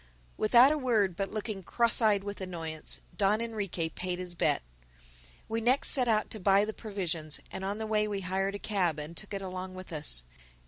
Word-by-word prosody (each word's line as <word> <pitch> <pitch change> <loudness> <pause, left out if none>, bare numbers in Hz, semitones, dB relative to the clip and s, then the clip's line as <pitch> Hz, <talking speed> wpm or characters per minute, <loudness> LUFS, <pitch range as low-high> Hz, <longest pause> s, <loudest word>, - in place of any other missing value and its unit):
Without 240 +5 +6
a 305 - 0
word, 215 -9 +1
but 195 +1 -2
looking 215 -2 -4
cross 235 +6 +2
eyed 210 -3 +3
with 205 0 -6
annoyance, 165 -4 -4
Don 205 +1 +2
Enrique 205 -7 -2
paid 180 +2 -3
his 180 -1 -6
bet. 170 - +1 0.8
We 225 +1 -2
next 250 +4 +5
set 255 -4 +3
out 215 -2 +1
to 220 - -6
buy 195 +1 +4
the 220 - -4
provisions; 175 -9 -3
and 190 - -5
on 200 +2 -2
the 220 - -3
way 215 -1 +1
we 200 -2 -3
hired 195 +2 -1
a 200 - -6
cab 180 -7 +1
and 150 +3 -6
took 210 - -9
it 195 - -4
along 185 0 -6
with 185 -2 -9
us. 145 - +3
195 Hz, 200 wpm, -30 LUFS, 180-215 Hz, 0.8 s, Without